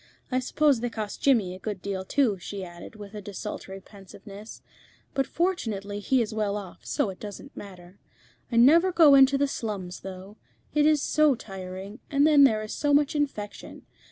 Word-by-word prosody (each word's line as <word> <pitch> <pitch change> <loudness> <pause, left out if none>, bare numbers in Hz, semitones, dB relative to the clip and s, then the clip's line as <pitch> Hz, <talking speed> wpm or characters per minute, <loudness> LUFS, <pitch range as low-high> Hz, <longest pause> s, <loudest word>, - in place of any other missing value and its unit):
I 255 - +2
suppose 280 0 +2
they 245 +1 -2
cost 215 -3 -6
Jimmy 225 -10 +3
a 185 - -10
good 205 -1 -5
deal 190 0 -4
too," 215 -1 +1
she 195 +2 -6
added, 175 +5 -11
with 205 -1 -11
a 210 - -7
desultory 195 -1 -7
pensiveness; 200 +2 -13 0.5
"but 270 -1 0
fortunately 215 - -2
he 250 +4 +2
is 215 - -6
well 210 -2 -1
off, 195 -4 -10
so 200 - -1
it 185 - -13
doesn't 210 +7 -9
matter. 185 -2 -12 0.5
I - - -2
never 320 +10 +6
go 325 -5 +6
into 275 0 +6
the 285 +1 +1
slums, 200 -9 -5
though. 190 +2 -10 0.4
It 300 0 +4
is 305 -2 +3
so 305 -3 +3
tiring, 195 +1 -8
and 285 0 +3
then 295 -2 +7
there 215 -4 +2
is 215 - -6
so 290 -1 +2
much 290 0 +2
infection. 275 -9 -4
215 Hz, 185 wpm, -26 LUFS, 195-275 Hz, 0.5 s, then